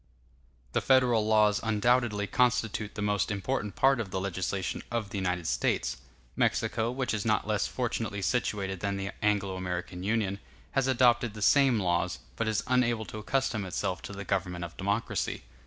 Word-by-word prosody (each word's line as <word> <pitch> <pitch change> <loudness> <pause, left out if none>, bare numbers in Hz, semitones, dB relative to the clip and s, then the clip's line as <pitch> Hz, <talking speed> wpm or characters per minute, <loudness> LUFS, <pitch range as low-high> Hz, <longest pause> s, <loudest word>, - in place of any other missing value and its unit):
The - - +1
Federal 125 -5 +4
laws 105 -2 +4
undoubtedly 110 -1 +2
constitute 115 -2 +1
the 105 - -3
most 105 -3 +1
important 105 -1 -2
part 135 +5 +4
of 110 -4 -3
the 95 - -2
legislation 95 0 -2
of 115 -4 -3
the 100 - -2
United 90 -2 -1
States. - - 0 0.4
Mexico, 115 +1 +1
which 125 0 -2
is 105 -2 -1
not 110 -2 +1
less 105 -1 0
fortunately 115 -5 -2
situated 100 -4 -1
than 100 +1 -2
the 95 0 -3
Anglo 100 -3 +1
American 90 -1 -4
Union, 100 -1 0 0.3
has 135 -1 +1
adopted 120 -3 +3
the 105 - -7
same 135 -1 +5
laws, 85 -3 0 0.2
but 115 - -1
is 110 -1 0
unable 120 -3 +1
to 110 - -7
accustom 120 -1 0
itself 90 -1 -2
to - - -7
the 100 0 -7
government 90 -3 -1
of 85 - -10
democracy. 100 - -2
105 Hz, 170 wpm, -29 LUFS, 95-120 Hz, 0.4 s, same